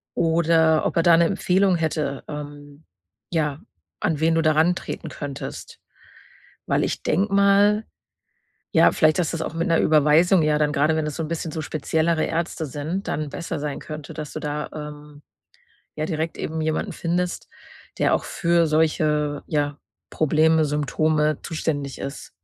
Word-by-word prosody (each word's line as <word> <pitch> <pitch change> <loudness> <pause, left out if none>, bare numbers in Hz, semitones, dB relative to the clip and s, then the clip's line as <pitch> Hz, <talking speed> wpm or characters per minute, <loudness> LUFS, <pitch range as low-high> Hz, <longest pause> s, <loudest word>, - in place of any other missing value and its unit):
oder 160 -1 +3
ob - - -1
er 165 - +4
da 170 - +6
'ne 170 - +4
Empfehlung 190 +1 +2
hätte, 155 -4 -2
ähm, 145 0 -9 0.5
ja, 150 -4 -1 0.4
an 160 -4 0
wen 165 +1 +3
du 165 - +3
da 155 0 +4
rantreten 165 +4 0
könntest. 140 -2 -7 0.9
Weil - - +1
ich - - -3
denke 195 +6 +1
mal, 200 +2 +4 0.9
ja, - - +6
vielleicht 155 +1 +3
dass 170 - 0
das 165 - -3
auch - - -5
mit 170 +3 -1
'ner 165 - +3
Überweisung 155 +4 +4
ja 150 0 +2
dann 150 -1 +2
grade, 155 +2 +2
wenn 160 -1 -1
das 150 - -4
so 165 - -2
'n - - -4
bisschen 165 -1 -3
so 155 - -4
speziellere 160 +2 0
Ärzte 165 0 -2
sind, 155 +8 -4
dann 150 -1 -2
besser 165 +1 -5
sein 145 -1 -4
könnte, 155 -2 -8
dass 150 -2 -7
du - - -4
da, 150 0 -4
ähm, 150 -1 -9 0.7
ja 155 - -2
direkt 160 0 -3
eben 160 0 -3
jemanden 155 0 -1
findest, 175 +1 -2 0.5
der - - +3
auch - - -3
für 170 -1 +1
solche, 150 -2 +1
ja, 145 -2 -1 0.3
Probleme, 155 +1 +3
Symptome 150 +1 +1
zuständig 145 -4 -3
ist. 140 +1 -7
155 Hz, 165 wpm, -23 LUFS, 150-165 Hz, 0.9 s, da